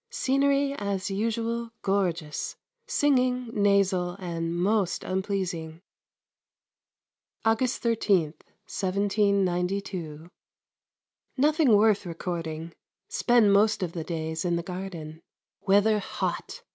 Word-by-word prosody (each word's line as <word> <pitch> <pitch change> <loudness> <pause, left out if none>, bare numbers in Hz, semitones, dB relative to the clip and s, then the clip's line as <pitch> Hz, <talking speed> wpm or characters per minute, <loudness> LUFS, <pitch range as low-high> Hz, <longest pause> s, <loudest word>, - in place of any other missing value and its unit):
Scenery 275 - +1
as 200 -5 -3
usual 230 +3 -1
gorgeous, 175 -6 -1 0.3
singing 255 - +1
nasal 200 -3 +2
and 170 -3 -3
most 195 0 +1
unpleasing. 185 -4 -3 1.7
August 225 +3 +1
13, 200 -9 +2 0.3
1792. 190 -4 -1 1.1
Nothing 295 -3 +4
worth 210 -2 +3
recording. 165 -1 -5 0.4
Spend 235 -5 +4
most 210 0 +3
of 175 - -2
the 170 -2 -4
days 160 -1 -3
in 175 -1 +1
the 170 - -2
garden. 170 -4 -7 0.5
Weather 205 +2 +4
hot. 480 - -4
195 Hz, 90 wpm, -27 LUFS, 175-225 Hz, 1.7 s, Nothing